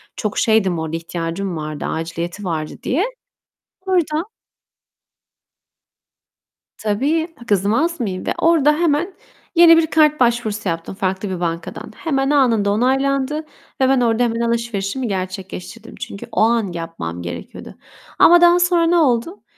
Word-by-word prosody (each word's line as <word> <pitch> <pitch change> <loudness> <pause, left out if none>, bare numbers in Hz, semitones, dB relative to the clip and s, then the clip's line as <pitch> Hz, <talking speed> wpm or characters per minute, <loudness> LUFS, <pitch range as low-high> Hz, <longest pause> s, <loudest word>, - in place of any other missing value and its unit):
çok 210 -1 -3
şeydim, 195 -6 +2
orada 160 0 -3
ihtiyacım 170 +2 -4
vardı, 150 -1 -5
aciliyeti 170 +4 -4
vardı 160 -4 -3
diye. 335 - +1 0.8
Orada 345 -1 0 2.5
Tabii, 280 +11 0 0.2
kızmaz 220 - +1
mıyım, 190 -5 -3
ve - - 0
orada 315 -3 +4
hemen 340 +3 +1 0.4
yeni 330 -1 +8
bir 320 -1 +3
kart 305 -1 +3
başvurusu 230 -4 0
yaptım 165 +3 -4
farklı 190 0 -2
bir 185 -2 -4
bankadan. 170 -1 -4
Hemen, 270 -4 -1
anında 235 -8 +3
onaylandı 270 +5 +1
ve - - -17 0.5
ben 265 -2 +3
orada 235 0 +2
hemen 230 -1 -1
alışverişimi 235 0 -2
gerçekleştirdim. 190 +3 -6
Çünkü 200 - -7
o 220 - 0
an 225 -3 +2
yapmam 165 - -6
gerekiyordu. 85 0 -8 0.4
Ama 345 +1 +7
daha 350 0 +6
sonra 350 -1 +3
ne 345 - +3
oldu? 300 - +1
230 Hz, 130 wpm, -19 LUFS, 185-300 Hz, 2.5 s, yeni